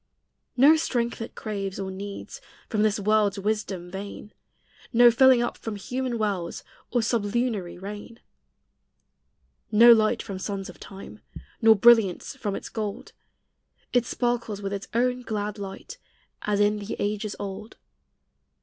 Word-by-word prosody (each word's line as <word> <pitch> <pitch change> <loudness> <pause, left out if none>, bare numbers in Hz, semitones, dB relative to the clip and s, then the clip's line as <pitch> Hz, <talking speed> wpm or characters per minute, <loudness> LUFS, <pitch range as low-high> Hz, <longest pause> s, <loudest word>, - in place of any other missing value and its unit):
No 285 +5 +7
strength 240 -7 -1
it 225 - -7
craves 200 -3 -4
or 190 -1 -4
needs 200 +1 -8 0.3
From 215 -3 0
this 215 0 +2
world's 210 0 +2
wisdom 200 -3 -3
vain; 200 +2 -8 0.6
No 240 +1 +7
filling 255 0 +5
up 240 - -4
from 220 -2 -5
human 250 +4 -3
wells, 200 -6 -2 0.3
Or 240 -2 +1
sublunary 220 -4 -1
rain. 205 +5 -8 1.5
No 230 +3 +8
light 225 +1 +2
from 195 -3 -6
sons 195 0 -4
of - - -20
time, 195 0 -11 0.4
Nor 225 -1 +7
brilliance 225 0 +4
from 210 -6 -3
its - - -6
gold; 210 -3 -5 0.8
It 245 -1 +2
sparkles 235 -4 -1
with 200 -1 -4
its 200 -1 -5
own 250 +1 +1
glad 210 -2 -4
light, 195 - -8 0.4
As 210 -1 0
in 205 0 +3
the 205 +1 -5
ages 210 0 -2
old. 200 +2 -7
210 Hz, 140 wpm, -26 LUFS, 200-235 Hz, 1.5 s, No